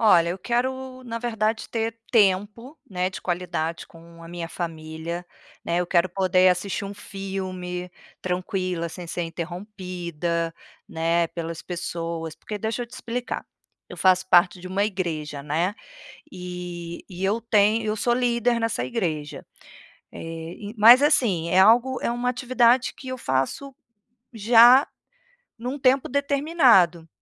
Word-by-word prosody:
Olha, 175 -7 +5
eu 180 - -4
quero, 255 +4 -2
na 230 -1 -4
verdade, 225 -2 -1
ter 225 0 -2
tempo, 210 +5 +1
né, 185 -1 -1
de 190 - -8
qualidade 170 -2 -3
com 165 0 -16
a 165 - -11
minha 170 -1 -6
família, 165 +1 -5 0.4
né, 170 +1 0
eu 180 - -1
quero 175 0 +3
poder 185 0 +3
assistir 190 +3 -2
um 200 - -6
filme 185 -3 -5 0.3
tranquila 180 -1 -2
sem 175 +1 -8
ser 175 +1 -3
interrompida, 170 -1 -4 0.3
né, 165 +1 +1
pelas 165 -1 -6
pessoas. 170 -2 -5
Porque, 210 - -6
deixa 225 +3 -2
eu - - -6
te 235 - -26
explicar, 245 +1 -4 0.4
eu - - -9
faço 185 0 +3
parte 180 0 +4
de 185 - -8
uma 195 +2 +1
igreja, 160 -8 -3
né, 165 +7 -1 0.6
e 180 -2 -7
e 185 0 -6
eu 205 +4 +1
tenho 220 0 +3
eu 215 0 -1
sou 240 +3 +1
líder 240 -1 +1
nessa 225 - -1
igreja. 155 - -3 0.7
Eh, - - -9 0.5
e - - -17
mas, 235 +5 +9
assim, 220 - +2
é 180 - +2
algo 240 +6 +5
é - - 0
uma 240 +1 -1
atividade 250 0 +2
que 265 - -11
eu 255 - -4
faço 135 - -2 0.6
já 235 +4 +7 0.7
em 235 - -8
um 265 +3 -3
tempo 265 0 +3
determinado, 275 - +3
185 Hz, 145 wpm, -24 LUFS, 170-235 Hz, 0.7 s, mas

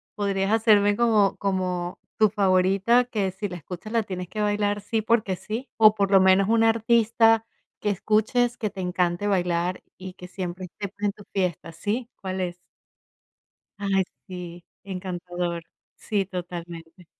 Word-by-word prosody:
¿podrías 200 -1 0
hacerme 210 -2 +4
como 215 -4 +3
como 185 -2 -2 0.2
tu 215 -1 +5
favorita? 195 +4 +3
Que 205 -6 -1
si 205 +2 -4
la 180 - -6
escuchas, 180 +6 -8
la 230 -1 +2
tienes 180 -2 -5
que 215 - -4
bailar 205 0 0
sí 220 +2 -1
porque 215 -4 +1
sí, 225 +8 -6
o, 215 -1 +7
por 200 -1 0
lo 195 - +7
menos 190 +2 +4
un 225 0 +4
artista 225 0 +4 0.3
que 210 - -1
escuches 220 +5 +1
que 215 - -2
te 195 -2 -7
encante 180 +2 0
bailar 180 -2 0 0.2
y 185 0 -8
que 180 - -11
siempre 185 0 -5
esté, 200 +3 -7
pues, 205 +1 -6
en 205 - +2
tu 205 - -14
fiesta 180 -4 -1
¿Sí? 225 +8 -3
¿Cuál 190 -1 -3
es? 175 -1 -2 1.2
Ay 195 -2 +1 0.2
sí, 175 -2 -8 0.2
encantador. 180 -2 -4 0.3
Sí, 200 -3 -1
totalmente. 175 -1 -8
195 Hz, 155 wpm, -25 LUFS, 180-215 Hz, 1.2 s, o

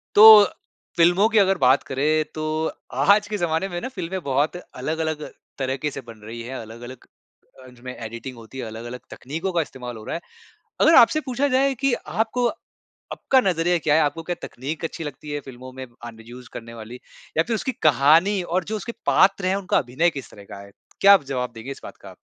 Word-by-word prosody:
तो 215 0 +11 0.5
फ़िल्मों 175 +5 +4
की 225 -1 +2
अगर 195 -2 +3
बात 130 +1 +4
करें 155 +4 0
तो 155 - -5 0.5
आज 205 +1 +4
के 215 - -2
ज़माने 175 +1 0
में 175 -2 -5
ना 255 - -4
फ़िल्में 190 -5 -5
बहुत 140 +5 0
अलग-अलग 155 0 -4 0.4
तरह 130 0 -1
के 150 - +1
से 140 - -7
बन 115 -1 -11
रही 115 +2 -8
है 130 +3 -6
अलग-अलग 115 +3 -10 0.6
अ, 130 - -13
जो 125 -1 -18
में 125 0 -7
एडिटिंग 115 +3 -7
होती 115 +3 -12
है, 130 - -4
अलग-अलग 120 +3 -8
तकनीकों 165 +8 -5
का 175 - +1
इस्तेमाल 125 -5 -8
हो 110 - -10
रहा - - -4
है। - - -6 0.6
अगर 330 - +6
आपसे 310 +5 +6
पूछा 260 +2 0
जाए 270 +1 +2
कि 275 +1 0
आपको 235 +2 -1 0.7
आपका 265 - +2
नज़रिया 175 -3 +1
क्या 155 -2 +1
है 160 - +4
आपको 150 +2 -1
क्या 175 - 0
तकनीक 145 +6 -6
अच्छी 165 - -5
लगती 150 0 -8
है 145 - -2
फ़िल्मों 130 0 -10
में 130 0 -7 0.2
आन 115 -1 -10
यूज़ 120 +1 -12
करने 115 0 -8
वाली? 115 +2 -9 0.4
या 160 - +4
फ़िर 230 - -2
उसकी 260 - -2 0.2
कहानी 160 +8 +4
और 175 +2 -1
जो - - 0
उसके 215 +2 -5
पात्र 195 0 +3
हैं 190 - +2
उनका 195 -2 0
अभिनय 130 +7 +1
किस 135 - -11
तरह 100 - -13
का 100 - -8
है? 100 0 -14 0.3
क्या 200 0 +9
आप 195 - +4
जवाब 125 -1 -2
देंगे 115 +4 -7
इस 135 - -8
बात - - -10
का? - - -11
155 Hz, 215 wpm, -23 LUFS, 125-190 Hz, 0.7 s, तो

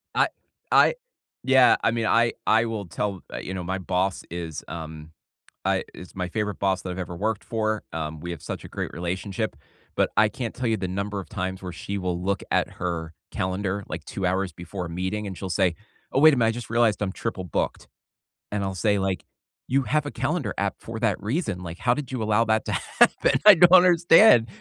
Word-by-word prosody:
I - - +4 0.4
I - - +6 0.5
Yeah, 130 -1 +6
I 110 - +3
mean, 115 -1 -1
I 115 +2 +3
I 110 +1 +4
will 110 -4 -4
tell 95 +3 -3
uh, - - -4
you 95 - -5
know, 90 -2 -4
my 95 +2 -2
boss 95 0 -1
is, 85 -3 -5
um, 80 -1 -8 0.5
I - - +1
is 90 - -11
my 90 -1 -3
favorite 105 0 -3
boss 95 -2 0
that 90 - -5
I've 90 - -5
ever 90 -1 -5
worked 110 +3 -2
for. 110 -1 -1
Um, 80 -1 -4
we 85 - -6
have 85 - -6
such - - -6
a - - -8
great - - -4
relationship, 95 +2 -3 0.4
but - - +2
I 110 0 +5
can't 115 +1 -5
tell 125 0 -3
you 110 - +2
the 95 -2 -3
number 100 +2 -3
of - - -11
times 95 -2 -4
where 90 -2 -5
she 100 +4 -5
will 90 -2 -2
look 100 0 -1
at - - +2
her 85 -2 -4 0.2
calendar, 95 +2 -2
like, 85 -2 -6
2 95 -2 -3
hours 95 0 0
before 90 +2 -6
a - - -6
meeting, 95 +5 -3
and 95 - -6
she'll 95 -2 -5
say, 90 -2 +2 0.4
"Oh, 135 - +2
wait 155 -1 +8
a - - -3
minute, 115 -2 +3
I - - +2
just 120 -1 -7
realized 120 -3 +2
I'm 95 -2 -1
triple 100 -4 -4
booked," 85 - -3 0.6
and 100 -1 -1
I'll 95 -1 -3
say, 100 +2 +2
like, 95 -1 -2 0.4
"You 135 +1 +2
have 150 +5 0
a 145 - -4
calendar 140 - -2
app 100 0 -1
for 115 0 -7
that 110 -4 0
reason. 105 - -2
Like, 85 0 -7
how 120 - +3
did 140 -1 -5
you 125 -4 -2
allow 110 +2 +2
that 110 0 +1
to - - -3
happen?" - - +2
I 210 - +11
don't 175 +1 +6
understand. 175 - +7
100 Hz, 220 wpm, -25 LUFS, 90-115 Hz, 0.6 s, I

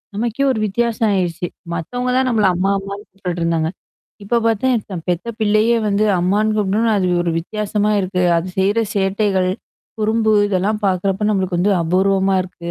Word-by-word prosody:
நமக்கே 235 +5 -1
ஒரு 220 - -2
வித்தியாசம் 225 +1 0
ஆயிருச்சு. 175 -2 -1 0.3
மத்தவங்க 245 +10 -3
தான் 260 - +2
நம்மள 215 -5 +2
அம்மா 195 +2 +1
அம்மான்னு 200 +2 -7
கூட்டுட்டுருந்தாங்க. 170 -4 -2 0.5
இப்ப 235 +4 +1
பார்த்தா, 225 -4 0
பெத்த 175 +6 -1
பிள்ளையே 215 +2 +3
வந்து 205 +1 +1 0.2
அம்மான்னு 210 +4 +1
கூப்ட்னோனா 210 +3 +1
அது 185 - +1 0.2
ஒரு 170 - 0
வித்தியாசமா 210 +3 -1
இருக்கு. 185 -1 -1
அது 170 +3 -4
செய்ற 200 +4 +2 0.2
சேட்டைகள். 195 -1 +1 0.5
குறும்பு 220 0 +2 0.2
இதெல்லாம் 205 +2 0
பார்க்கறப்ப 195 +2 0
நம்மளுக்கு 185 -3 0
வந்து 200 +3 +2
அபூர்வமா 190 +3 +2
இருக்கு. 180 -2 -8
200 Hz, 145 wpm, -19 LUFS, 185-215 Hz, 0.5 s, பிள்ளையே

